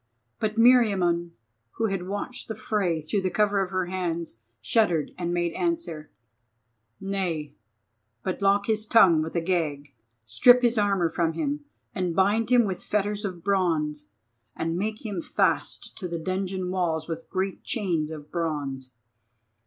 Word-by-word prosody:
But 215 -1 -1
Meriamun, 195 -8 +4 0.4
who 225 - -1
had 195 -4 -2
watched 205 +5 -4
the 220 - -4
fray 195 -6 -1
through 185 +5 -1
cover 205 0 +2
of 190 - -2
her 185 -1 -1
hands, 170 -7 -3 0.2
shuddered 175 -9 +1
and 175 -1 -3
made 175 -1 0
answer: 335 - -2 0.9
"Nay, 175 -7 -2 0.7
but 185 - -3
lock 200 +1 +3
his 215 0 0
tongue 180 -8 +6
with 160 +2 -5
a 170 - +2
gag, 150 -5 -2 0.3
strip 245 - +6
his 240 -2 +3
armour 195 -5 +2
from 165 -1 0
him, 285 - -2 0.3
and 180 -5 -2
bind 205 +4 +2
him 245 -2 +5
with 190 -3 -4
fetters 210 0 -1
of 180 -4 -5
bronze, 160 - 0 0.5
and 165 +1 -2
make 215 +5 -3
him 200 -5 -3
fast - - 0
to 185 - -4
the 170 -1 -3
dungeon 185 +1 -2
walls 165 -4 -1
with 165 -1 -6
great 190 0 -2
chains 170 -9 -1
of 150 -2 -9
bronze. 140 -6 -3
185 Hz, 150 wpm, -26 LUFS, 165-205 Hz, 0.9 s, tongue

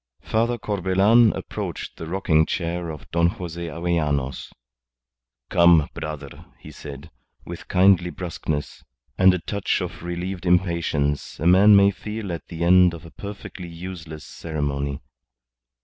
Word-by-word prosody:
Father 115 +2 0
Corbelan 105 +3 +3
approached - - -6
the 80 - -7
rocking 80 -3 +2
chair 85 -1 -3
of 75 -2 -8
Don 85 0 +3
Jose 85 -1 -5
Avellanos. 75 -5 -2 1.0
"Come, 85 -3 +5
brother," 75 -3 -7
he - - -12
said, 75 +2 -10 0.3
with - - -9
kindly 90 -1 +4
brusqueness 80 -5 -5 0.3
and 95 0 +6
a 90 - 0
touch 100 +3 -2
of - - -6
relieved 90 +1 -4
impatience 85 -5 0
a 80 - -3
man 95 +4 +7
may 100 0 +6
feel 105 0 -6
at 85 - -7
the 85 -1 -5
end 90 0 +5
of 85 0 -12
a 80 - -12
perfectly 100 -3 -8
useless 85 -3 -8
ceremony. 70 -3 -4
85 Hz, 135 wpm, -23 LUFS, 80-95 Hz, 1.0 s, man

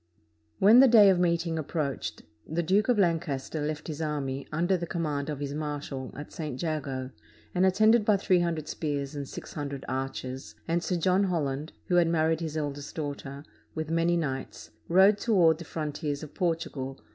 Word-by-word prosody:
When 215 +5 +7
the 270 - +8
day 215 -5 +8
of 180 - +1
meeting 170 -2 +1
approached, 150 -2 -3 0.2
the 170 +2 -1
Duke 200 +7 +2
of 245 - +4
Lancaster 165 -5 0
left 150 0 -3
his 155 -1 -5
army, 140 -3 -3
under 175 +5 +1
the 175 -1 -3
command 150 -4 -2
of 150 -2 -4
his 140 -1 -4
marshal, 145 -3 -4
at 145 - -8
St. 150 -6 -5
Jago, 140 -5 -3 0.4
and 185 +1 +3
attended 215 +4 +4
by 210 -1 +4
three 185 -2 +3
hundred 165 -3 -1
spears 145 -2 -3
and 140 -2 -5
six - - -8
hundred 140 -2 -5
archers, 130 0 -4
and 170 +1 0
Sir 180 - -1
John 185 +3 +2
Holland 150 -4 -2
(who 175 - +2
had 175 -1 +5
married 160 -1 +2
his 160 -2 -4
eldest 145 -1 -4
daughter) 145 -2 -5 0.3
with 160 0 -3
many 165 +1 +2
knights, 135 -5 -4 0.2
rode 195 +4 +5
toward 170 -8 +4
the 170 - -8
frontiers 150 -2 -4
of 150 - -9
Portugal. 160 -6 -2
160 Hz, 180 wpm, -28 LUFS, 145-175 Hz, 0.4 s, the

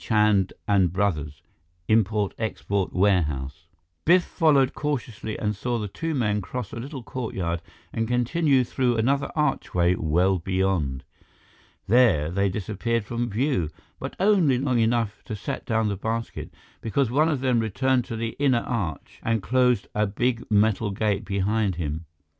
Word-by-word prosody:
CHAND 105 -3 +3
& - - -46 0.3
BROS. 75 -8 -1 0.4
Import 105 -2 +2
Export 100 -3 -2
Warehouse 75 -8 0 0.4
Biff 175 +2 +5
followed 145 -7 +3
cautiously 120 -7 -3
and 105 -1 -1
saw 120 +4 -2
the 105 -2 -3
two 160 +10 -3
men 105 -5 +1
cross 110 +2 -6
a - - -5
little 135 +1 -7
courtyard 95 -9 -3 0.3
and 115 0 -1
continue 130 +3 +2
through 125 -1 0
another 140 +5 +1
archway 90 - +1
well 90 +3 +1
beyond. 95 -7 -1 0.8
There 105 -10 +4
they 100 +2 +1
disappeared 110 +3 -2
from 120 +2 -2
view 110 - 0 0.3
but - - -6
only 185 -9 +4
long 130 -2 +1
enough 115 -2 0
to 110 - -4
set 105 - -5
down 110 -1 +1
the 100 -2 -2
basket, 115 +3 -4 0.3
because 120 +2 0
one 155 +5 +3
of 145 -5 -1
them 130 -3 +2
returned 125 +4 +1
to 115 - -5
the 115 0 -3
inner 130 -4 +3
arch 100 - -4
and 115 -3 0
closed 125 -3 +2
a 105 0 +1
big 120 +4 -1
metal 105 0 +2
gate 100 0 -1
behind 100 0 0
him. 80 -1 -4
110 Hz, 150 wpm, -25 LUFS, 95-125 Hz, 0.8 s, Biff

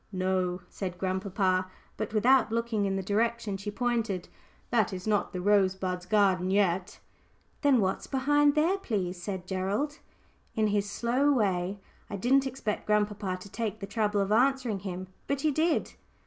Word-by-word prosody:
"No," 185 -1 0
said 185 -3 -5
grandpapa, 185 0 0 0.3
but 215 -1 -4
without 245 +3 +4
looking 230 -2 0
in 195 - -1
the 195 - -2
direction 220 +1 0
she 195 +2 -5
pointed, 230 -5 -1 0.4
"that 225 -5 +2
is 185 -1 -6
not 210 -2 +1
the 180 - -4
Rosebuds' 185 -2 +1
garden 190 -2 +3
yet." 190 -2 +1 0.6
"Then 280 -4 +4
what's 190 -2 -1
behind 290 +2 +3
there, 340 +6 +2
please?" 185 - -2
said 190 -1 -4
Gerald, 200 +11 -2 0.6
in 220 - +2
his 205 0 0
slow 245 +7 +1
way. 195 -6 +1 0.3
I 205 - -4
didn't 265 +7 +3
expect 245 -5 -4
grandpapa 210 -3 0
to 200 - -10
take 220 -2 -3
the 195 - -5
trouble 205 0 0
of 195 +1 -1
answering 250 -2 +2
him, 185 -1 -5 0.2
but 280 -1 -1
he 310 - +2
did. 315 +3 +1
205 Hz, 160 wpm, -29 LUFS, 190-235 Hz, 0.6 s, without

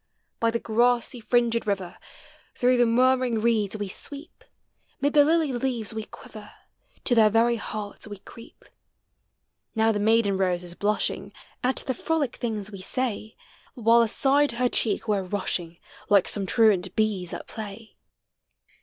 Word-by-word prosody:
By 230 - +2
the 230 - 0
grassy 240 +2 +1
fringed 235 0 +1
river, 195 -3 -3 0.6
Through 250 0 +2
the 240 -1 +4
murmuring 250 0 +2
reeda 215 -2 0
we 205 -1 -4
sweep; 285 - -6 0.6
Mid 285 +1 0
the 295 -1 +7
lily 315 -2 +2
lea 245 -2 -2
ves 215 - -3
we 220 -1 -5
quiver. 215 0 -12 0.5
To 250 - +1
their 220 -2 +5
very 230 +2 +2
hearts 210 -1 -6
we 205 -1 -8
creep. 230 +4 -15 1.1
Now 220 0 +3
the 205 - -1
maiden 215 -2 +2
rose 180 -2 0
is 175 -1 -7
blushing 210 +3 -1 0.3
Al 255 +1 +2
the 260 - -1
frolic 290 0 -2
things 215 -4 -4
we 195 -2 -9
say, 220 0 -2 0.4
AVhile 230 0 +5
aside 275 +4 +2
her 245 +1 +1
cheek 225 0 -1
we're 205 -2 +1
rushing. 180 -3 -4 0.3
Like 200 -2 +4
some 200 -2 +2
truaul 195 -4 +2
bees 205 -5 0
at - - -6
play. 215 0 -9
225 Hz, 155 wpm, -25 LUFS, 205-245 Hz, 1.1 s, the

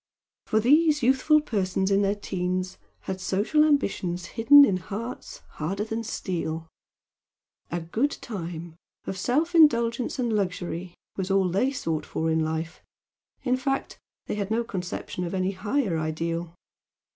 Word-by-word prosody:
For 220 - +2
these 295 +4 +4
youthful 270 +5 +4
persons 190 -6 -1
in 200 0 +4
their 200 0 +1
'teens 185 -2 -3 0.2
had 190 -1 -5
social 205 +12 +2
ambitions 195 - 0
hidden 280 +5 +8
in 190 -8 +1
hearts 210 +7 -7 0.2
harder 195 +7 -1
than 225 +1 -3
steel 165 -6 -3 1.0
"a 175 0 -2
good 220 - 0
time" 170 -6 -7 0.3
of - - -4
self 290 - 0
indulgence 235 -7 +4
and 240 -3 0
luxury 180 -3 -2 0.2
was 190 -1 -2
all 195 -1 +3
they 205 +10 +1
sought 165 - -3
for 160 0 -1
in 160 - +2
life 160 +1 -3 0.6
in 255 -1 +2
fact, 270 +1 -2 0.3
they - - -3
had 205 -1 -2
no 230 +2 +1
conception 180 -3 -5
of 175 +2 -3
any 185 0 0
higher 205 +1 -1
ideal. 165 +2 -3
195 Hz, 145 wpm, -26 LUFS, 175-245 Hz, 1.0 s, hidden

